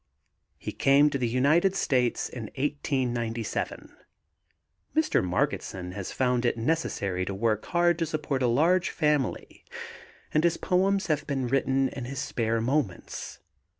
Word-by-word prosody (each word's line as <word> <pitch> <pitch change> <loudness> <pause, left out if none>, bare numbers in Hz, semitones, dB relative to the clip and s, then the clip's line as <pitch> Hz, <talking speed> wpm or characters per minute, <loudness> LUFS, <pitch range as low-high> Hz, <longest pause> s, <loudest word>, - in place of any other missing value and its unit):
He - - -5
came 145 +2 +4
to 140 - -1
the 125 - +1
United 155 +11 +3
States 125 -9 +1
in 120 -3 -7
1897. 125 -5 -2 1.0
Mr. 315 - +2
Margetson 90 0 -2
has 95 0 -6
found 125 -2 +1
it 120 -1 +1
necessary 115 - -1
to 95 +1 -4
work 110 +1 0
hard 175 -1 +2
to 165 - 0
support 150 -3 -2
a 125 - +3
large 165 +9 +3
family 150 -4 -1 0.7
and 155 - +3
his 170 -1 +2
poems 195 +2 +1
have 155 -3 -1
been 135 -3 -1
written 135 +1 +2
in 130 -2 -6
his 135 +2 -6
spare 115 -4 -1
moments. 120 - -2
135 Hz, 140 wpm, -27 LUFS, 115-155 Hz, 1.0 s, came